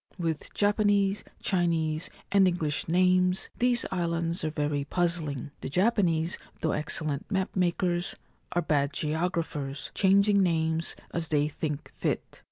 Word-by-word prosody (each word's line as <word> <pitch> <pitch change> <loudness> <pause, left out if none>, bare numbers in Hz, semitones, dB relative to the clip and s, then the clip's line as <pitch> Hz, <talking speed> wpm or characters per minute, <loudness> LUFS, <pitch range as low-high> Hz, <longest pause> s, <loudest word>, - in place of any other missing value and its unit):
With 165 -4 -3
Japanese, 205 -1 +2 0.2
Chinese, 165 -4 0 0.2
and 195 -1 +5
English 160 -4 -1
names, 185 +2 +3
these 245 -1 +3
islands 170 -2 -1
are 155 - 0
very 145 -2 -1
puzzling. 155 -4 -1
The - - -4
Japanese, 175 - +2 0.2
though 160 - +1
excellent 150 -1 -2
map 190 -2 -1
makers, 175 -1 0 0.4
are 175 - +1
bad 145 -2 +1
geographers, 155 -3 -2
changing 200 +1 +4
names 160 -2 +1 0.2
as 170 -1 -2
they 150 -1 +2
think 150 -1 -4
fit. - - -2
170 Hz, 125 wpm, -28 LUFS, 155-185 Hz, 0.4 s, and